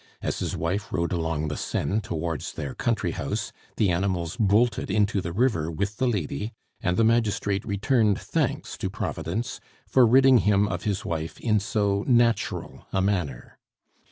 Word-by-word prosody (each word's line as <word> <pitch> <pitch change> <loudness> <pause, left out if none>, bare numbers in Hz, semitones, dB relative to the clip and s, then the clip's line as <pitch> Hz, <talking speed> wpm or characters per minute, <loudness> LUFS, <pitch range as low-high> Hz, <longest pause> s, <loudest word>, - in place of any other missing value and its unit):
As - - -3
his - - -2
wife 95 +6 -2
rode 85 0 -1
along 80 -3 -1
the 75 - -3
Seine 105 +3 -1
towards 85 - -3
their 70 -3 -5
country - - 0
house, - - -3 0.3
the 100 -4 +3
animals 85 -2 -1
bolted 110 +4 +2
into 105 -2 +2
the 85 - -4
river 95 -6 +1
with 100 +5 -3
the 130 - +1
lady, 105 - -2 0.3
and 90 0 0
the 115 - +4
magistrate 105 -3 +1
returned 105 0 +2
thanks - - -2
to - - -2
Providence 110 +8 -3 0.3
for 130 -3 +5
ridding 130 +1 +6
him 105 -1 +3
of - - -4
his 100 -3 -1
wife 80 -1 -4
"in 110 -3 +2
so 100 0 0
natural 120 -2 +1
a 95 - +1
manner." 90 -10 -2
100 Hz, 160 wpm, -26 LUFS, 85-110 Hz, 0.3 s, ridding